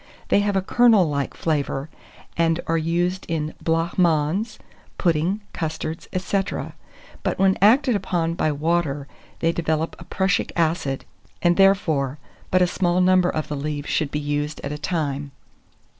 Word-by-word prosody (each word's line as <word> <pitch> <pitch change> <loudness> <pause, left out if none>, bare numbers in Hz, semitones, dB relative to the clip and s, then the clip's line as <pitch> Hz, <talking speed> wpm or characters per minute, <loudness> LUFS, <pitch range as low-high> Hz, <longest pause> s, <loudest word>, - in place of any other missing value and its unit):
They - - +4
have 205 -1 0
a 190 - +1
kernel 225 -4 +5
like 140 -2 -2
flavour, 145 -3 -1 0.5
and 165 0 +2
are 165 - 0
used 175 +3 0
in 155 -2 -2
blanc 165 +2 0
mange, 175 +6 +1 0.4
puddings, 175 +4 +1
custards 160 0 -4
&c. 195 +2 0 0.8
but - - -1
when 190 0 +4
acted 245 +4 +5
upon 175 -4 -1
by 155 -2 0
water, 150 -2 -1 0.3
they 165 - +3
develop 160 -1 -2
prussic 190 0 0
acid, 160 -5 0 0.4
and, 175 0 +4
therefore, 160 -8 +3 0.3
but 185 0 +4
a - - +5
small 180 0 +1
number 185 -1 +4
of 155 - -2
the 150 - -3
leaves 145 0 -4
should 155 -3 0
be 150 - -3
used 145 +1 -2
at 140 - -3
a 150 - -4
time. 145 -3 -2
165 Hz, 150 wpm, -23 LUFS, 150-185 Hz, 0.8 s, kernel